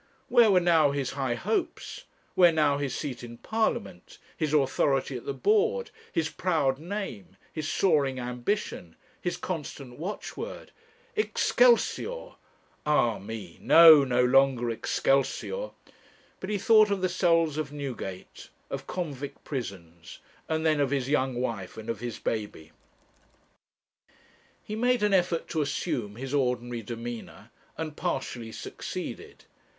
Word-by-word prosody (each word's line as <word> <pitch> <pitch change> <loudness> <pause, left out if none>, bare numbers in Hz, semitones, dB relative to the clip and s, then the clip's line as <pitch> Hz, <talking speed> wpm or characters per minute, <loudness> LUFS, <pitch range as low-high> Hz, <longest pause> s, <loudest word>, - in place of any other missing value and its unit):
Where 235 -2 +6
were 190 -2 +6
now 165 -4 +4
his 140 -2 -2
high 135 -3 -1
hopes, 225 - -3 0.3
where 175 -2 +6
now 150 -3 +2
his 135 -3 -2
seat 130 -5 -5
in 120 -1 -9
Parliament, 220 - -2 0.2
his 155 -3 -1
authority 135 -2 +1
at 120 - -7
the - - 0
board, 445 - +1 0.2
his 160 -1 0
proud 155 -7 0
name, 160 - -6 0.2
his 155 -2 -3
soaring 145 -8 +2
ambition, 125 - -3 0.3
his 175 -1 -2
constant 145 -8 -6
watchword? 190 +6 -6 0.4
'Excelsior' - - +2 0.5
ah 120 -7 +2
me 100 -4 -8
no! 160 -3 +9
no 125 -1 +2
longer 130 -2 +3
'Excelsior'; 140 - 0 0.7
but 190 - -6
he 210 - 0
thought 215 +1 +5
of 200 -2 -1
the 185 - +2
cells 165 -4 +2
of 150 -2 -3
Newgate, 130 -10 -7 0.2
of 135 0 -5
convict 145 -5 -5
prisons, 85 - -7 0.3
and 160 0 0
then 155 -2 +3
of 140 -2 +2
his 135 -2 -1
young 130 -3 +1
wife 115 -7 -4
and 110 +1 -4
of 115 - -6
his 120 0 -5
baby. 105 -8 -4 1.9
He 215 - -5
made 245 0 +2
an 205 -1 +3
effort 175 -3 +1
to 160 - 0
assume 120 -7 -2
his 130 +3 -6
ordinary 125 -3 0
demeanour, 115 +1 -7 0.3
and 155 -2 -4
partially 120 -6 -3
succeeded. - - -7
145 Hz, 135 wpm, -28 LUFS, 120-175 Hz, 1.9 s, no